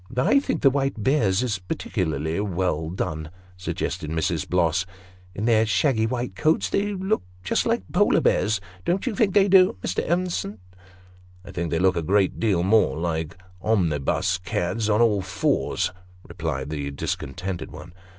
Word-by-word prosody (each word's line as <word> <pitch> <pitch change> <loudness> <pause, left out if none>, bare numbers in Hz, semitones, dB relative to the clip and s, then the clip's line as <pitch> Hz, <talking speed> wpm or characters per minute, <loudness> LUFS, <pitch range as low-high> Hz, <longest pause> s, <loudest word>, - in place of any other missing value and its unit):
" 125 - -13
I 130 - +4
think 280 - -3
the 135 - +6
white 135 0 0
boars 110 -3 +2
is 110 -6 -1
partickerlerly 80 -2 -2
well 90 -5 -1
done," 80 -3 -3 0.3
suggested 90 -4 -4
Mrs. 80 0 -1
Bloss. 90 0 +2 0.3
" 90 -1 -26
In 105 - -2
their 115 -2 +4
shaggy 110 0 +2
white 125 +1 -3
coats, 155 +1 +1
they 205 +1 0
look 190 +3 0 0.2
just 90 - 0
like - - +1
Polar - - +4
bears 110 -1 +2 0.2
don't 185 - 0
you 250 - -1
think 195 -2 +1
they 200 -1 +6
do, 185 - +5
Mr. - - -1
Evenson? 175 - -1 0.4
" 90 0 -25
"I - - -9
think 85 -3 -3
they 80 - 0
look 95 +1 +3
a 85 - 0
great 95 +3 +1
deal 100 -6 +2
more 95 -8 +3
like 80 +1 -2 0.2
omnibus 90 -2 +1
cads 90 +5 -2
on 105 +2 +3
all 105 -4 +2
fours," 95 0 0 0.4
replied 80 -5 -4
the 70 -2 -3
discontented 85 +5 -4
one. 90 - -11
95 Hz, 170 wpm, -24 LUFS, 85-115 Hz, 0.4 s, the